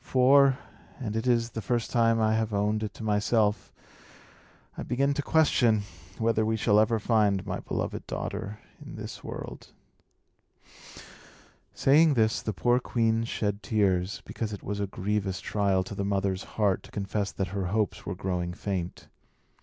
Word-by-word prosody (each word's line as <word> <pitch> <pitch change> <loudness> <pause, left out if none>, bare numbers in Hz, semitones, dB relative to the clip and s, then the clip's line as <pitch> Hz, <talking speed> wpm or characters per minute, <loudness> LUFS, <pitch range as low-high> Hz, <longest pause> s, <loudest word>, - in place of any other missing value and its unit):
For 135 +1 +5 0.4
and 110 -5 -4
it 110 +3 -1
is 120 -1 +2
the 110 - -4
first 120 +3 -1
time 115 -1 +3
I 110 0 +3
have 110 -1 0
owned 105 +1 +1
it 105 -2 -3
to - - -8
myself 105 0 +1 1.0
I - - -6
begin 135 +3 +1
to 145 - -1
question 125 -9 +3 0.3
whether 115 -1 +1
we 110 +1 0
shall 105 -1 +4
ever 110 +1 +3
find 105 -3 +2
my - - -3
beloved - - -4
daughter 105 +2 -4 0.3
in - - -9
this - - -8
world." - - -7 2.1
Saying 150 +2 +5
this, 110 -2 +2
the 110 - -2
poor 120 +5 +2
queen 115 -2 +1
shed 105 -2 -2
tears, 100 -3 0
because 110 -2 -4
it 100 - -8
was 100 0 -3
a 100 - -1
grievous 95 0 -2
trial 100 -3 +1
to 95 - -8
the 100 - -3
mother's 100 -1 -1
heart 100 -4 +2
to - - -15
confess 100 0 -2
that 95 -2 -2
her 95 -1 -2
hopes 105 0 -1
were - - -4
growing 90 -2 -2
faint. 90 -2 -4
105 Hz, 160 wpm, -28 LUFS, 100-115 Hz, 2.1 s, For